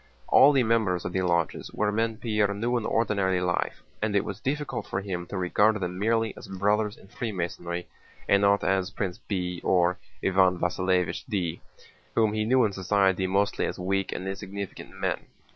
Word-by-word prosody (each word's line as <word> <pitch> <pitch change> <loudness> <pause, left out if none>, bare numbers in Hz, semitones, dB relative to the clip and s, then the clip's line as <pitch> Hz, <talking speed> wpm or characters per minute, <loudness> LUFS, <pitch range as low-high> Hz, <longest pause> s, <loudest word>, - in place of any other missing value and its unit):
All 140 - +8
the 135 -3 +3
members 110 -6 +1
of - - -3
the 95 - +1
lodges 85 -3 0
were 105 -1 +1
men 115 +1 0
Pierre 105 -3 +1
knew 120 +4 0
in 115 -2 0
ordinary 100 -5 +1
life, 90 -1 -1 0.2
and 105 -1 0
it 100 - +2
was 100 0 -5
difficult 135 +1 -3
for 95 - -2
him 90 -3 -4
to 100 - -5
regard 105 +4 +3
them 90 -1 -3
merely 115 +1 +1
as - - -11
Brothers 105 +2 0
in - - -17
Freemasonry 90 -5 -4 0.4
and 100 - +4
not 100 0 +3
as 95 -1 +1
Prince 100 -1 -4
B. 90 -5 -3
or 90 -1 +2 0.2
Iván 95 -1 +4
Vasílevich 90 0 0
D., 90 -7 -2 0.5
whom 110 -2 +3
he 110 0 0
knew 125 +1 +4
in 105 - -1
society 95 -1 +2
mostly 100 +2 +1
as - - -5
weak 95 +1 -1
and 95 - -4
insignificant 100 0 -6
men. - - -3
100 Hz, 180 wpm, -27 LUFS, 90-110 Hz, 0.5 s, All